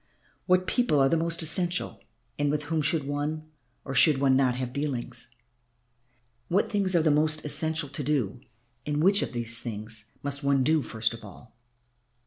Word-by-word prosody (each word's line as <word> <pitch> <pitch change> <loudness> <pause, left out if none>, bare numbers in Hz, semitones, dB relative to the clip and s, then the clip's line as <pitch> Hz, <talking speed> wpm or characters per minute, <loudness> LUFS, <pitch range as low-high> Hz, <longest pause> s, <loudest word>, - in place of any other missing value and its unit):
What 185 0 +3
people 240 - +1
are 135 0 +4
the - - +2
most 165 0 +2
essential 175 +3 +1 0.4
and 145 0 +1
with 150 +1 -1
whom 155 +1 -2
should 150 +1 0
one 145 +2 -3 0.4
or 135 - -5
should 140 +2 +5
one 135 -1 +2
not 130 -2 +2
have 125 -1 -5
dealings? 140 -5 -4 1.2
What 190 +4 0
things 195 -3 +2
are 165 - +3
the 155 - +3
most 155 +1 +2
essential 155 +1 0
to 145 +1 -5
do 125 -5 -1 0.4
and 150 +2 -2
which 200 +3 +5
of - - -3
those 115 -1 +1
things 110 -1 -7 0.2
must 140 +1 -3
one 140 -1 +2
do 155 +2 +2
first 110 -3 -2
of 115 - -11
all?" 110 +3 -14
145 Hz, 175 wpm, -26 LUFS, 125-160 Hz, 1.2 s, should